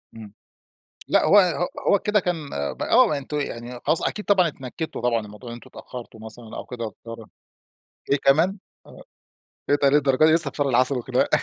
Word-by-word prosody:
إمم. 110 Hz, -3 st, -11 dB, 0.7 s
لأ -, -, +3 dB
هو 205 Hz, -, +7 dB
ه 175 Hz, -2 st, +1 dB, 0.2 s
هو 200 Hz, -, +4 dB
كده 210 Hz, +1 st, +1 dB
كان 165 Hz, -6 st, -3 dB, 0.2 s
ب -, -, -13 dB
آه، 150 Hz, -, +4 dB
أنتم 145 Hz, +2 st, -4 dB
يعني 120 Hz, -2 st, -6 dB
خلاص 155 Hz, +3 st, +1 dB
أكيد 210 Hz, -, -5 dB
طبعًا 190 Hz, -4 st, +4 dB
اتنكدتوا 150 Hz, +2 st, -6 dB
طبعًا 120 Hz, -2 st, +1 dB
من 105 Hz, -, -11 dB
موضوع 105 Hz, +4 st, -11 dB
إن 115 Hz, -, -6 dB
أنتم 120 Hz, -, -12 dB
اتأخرتوا 120 Hz, -3 st, -10 dB
مثلًا 110 Hz, 0 st, -10 dB
أو -, -, -6 dB
كده 125 Hz, -2 st, -7 dB
واضطر 115 Hz, +1 st, -10 dB, 0.8 s
إيه 140 Hz, -, +4 dB
كمان؟ 160 Hz, +9 st, +2 dB, 0.3 s
آه، -, -, -14 dB, 0.7 s
إيه 145 Hz, -, +5 dB
ده 140 Hz, -, +6 dB
للدرجة 140 Hz, 0 st, +3 dB
دي 155 Hz, -, +5 dB
لسه 160 Hz, -3 st, +2 dB
في -, -, -14 dB
شهر 145 Hz, -2 st, +1 dB
العسل 130 Hz, +2 st, +2 dB
والخناق. 120 Hz, -, 0 dB
140 Hz, 195 wpm, -23 LUFS, 120-160 Hz, 0.8 s, هو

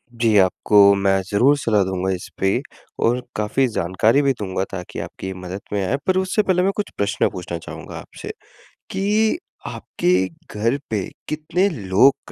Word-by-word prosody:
जी, 115 Hz, -2 st, +3 dB
आपको 100 Hz, +2 st, +5 dB
मैं 95 Hz, -1 st, +2 dB
ज़रूर 130 Hz, +8 st, +4 dB
सलाह 105 Hz, -7 st, +2 dB
दूँगा 95 Hz, 0 st, -2 dB
इस 90 Hz, -, -8 dB
पे 95 Hz, 0 st, +2 dB, 0.5 s
और 120 Hz, +2 st, +2 dB, 0.2 s
काफ़ी 110 Hz, +5 st, +1 dB
जानकारी 105 Hz, +6 st, +2 dB
भी 140 Hz, -1 st, +2 dB
दूँगा, 95 Hz, -1 st, -1 dB
ताकि 90 Hz, -2 st, -6 dB
आपकी 95 Hz, -, -6 dB
मदद 90 Hz, +2 st, -7 dB
में 100 Hz, -, +1 dB
आएँ, 135 Hz, +8 st, 0 dB
पर 185 Hz, 0 st, +3 dB
उससे 190 Hz, +3 st, +1 dB
पहले 180 Hz, -2 st, +2 dB
मैं 195 Hz, -, +3 dB
कुछ 210 Hz, -, -2 dB
प्रश्न 100 Hz, 0 st, +1 dB
पूछना 90 Hz, -2 st, -5 dB
चाहूँगा 80 Hz, -, -9 dB
आपसे, -, -, -10 dB, 0.6 s
कि 215 Hz, -, +2 dB, 0.3 s
आपके 90 Hz, -, -1 dB, 0.5 s
घर 115 Hz, +6 st, +2 dB
पे 105 Hz, -4 st, -1 dB, 0.2 s
कितने 155 Hz, +5 st, 0 dB
लोग 110 Hz, -, +2 dB
105 Hz, 160 wpm, -21 LUFS, 95-145 Hz, 0.6 s, आपको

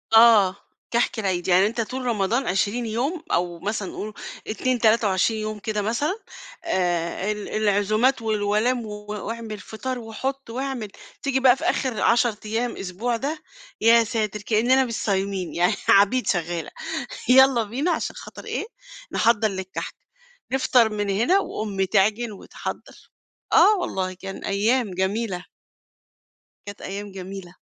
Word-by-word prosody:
آه، 215 Hz, -5 st, +7 dB, 0.4 s
كحك 235 Hz, -1 st, +1 dB
العيد، 185 Hz, -4 st, -1 dB
يعني 185 Hz, +2 st, +5 dB
أنت 230 Hz, +1 st, -2 dB
طول 255 Hz, +3 st, -4 dB
رمضان 230 Hz, +2 st, 0 dB
20 205 Hz, +6 st, 0 dB
يوم 275 Hz, +10 st, -2 dB
أو 175 Hz, -1 st, 0 dB
مثلًا 205 Hz, 0 st, -3 dB
قُل 215 Hz, 0 st, -5 dB, 0.3 s
2 250 Hz, +3 st, -1 dB
23 220 Hz, -1 st, +3 dB
يوم 215 Hz, 0 st, -4 dB
كده 210 Hz, 0 st, -2 dB
مثلًا، 290 Hz, -, -1 dB, 0.4 s
آآ 175 Hz, +2 st, 0 dB
ال 210 Hz, -1 st, -5 dB
العزومات 215 Hz, +4 st, +2 dB
والولايم 220 Hz, +3 st, +1 dB
و 210 Hz, 0 st, -8 dB
وأعمل 215 Hz, 0 st, -5 dB
فطار، 255 Hz, +3 st, -5 dB
وحُط 260 Hz, +4 st, -5 dB
واعمل، 255 Hz, -2 st, -3 dB, 0.3 s
تيجي 270 Hz, -1 st, +1 dB
بقى 255 Hz, -1 st, +6 dB
في 320 Hz, -, -8 dB
آخر 260 Hz, -10 st, 0 dB
10 235 Hz, -2 st, +3 dB
أيام 230 Hz, +3 st, -2 dB
أسبوع 210 Hz, +6 st, -2 dB
ده، 300 Hz, +5 st, -4 dB, 0.4 s
يا 230 Hz, +1 st, +6 dB
ساتر 215 Hz, -2 st, -2 dB
كأننا 245 Hz, +5 st, +3 dB
مش 230 Hz, -, -5 dB
صايمين 195 Hz, -2 st, -1 dB
يعني 180 Hz, +4 st, +2 dB
عبيد 205 Hz, +6 st, +5 dB
شغاّلة، 170 Hz, -2 st, -1 dB, 0.6 s
يالّا 260 Hz, -2 st, +6 dB
بينا 270 Hz, +11 st, -1 dB
عشان 320 Hz, -, -2 dB
خاطر -, -, -10 dB
إيه، -, -, -3 dB, 0.5 s
نحضر 225 Hz, -1 st, +3 dB
للكحك، 190 Hz, -2 st, -5 dB, 0.6 s
نفطر 250 Hz, -3 st, +4 dB
من 205 Hz, -1 st, -2 dB
هنا 235 Hz, -, +3 dB
وأمي 200 Hz, -, -2 dB
تعجن 215 Hz, +4 st, +2 dB
وتحضّر، 200 Hz, -, -8 dB, 0.4 s
آه، 425 Hz, -, +7 dB
والله 185 Hz, -, -2 dB
كان 195 Hz, +1 st, -8 dB
أيام 215 Hz, +2 st, +1 dB
جميلة. 190 Hz, 0 st, -2 dB, 1.2 s
كانت 205 Hz, 0 st, -9 dB
أيام 200 Hz, +1 st, -6 dB
جميلة. 190 Hz, -1 st, -8 dB
215 Hz, 135 wpm, -24 LUFS, 195-240 Hz, 1.2 s, آه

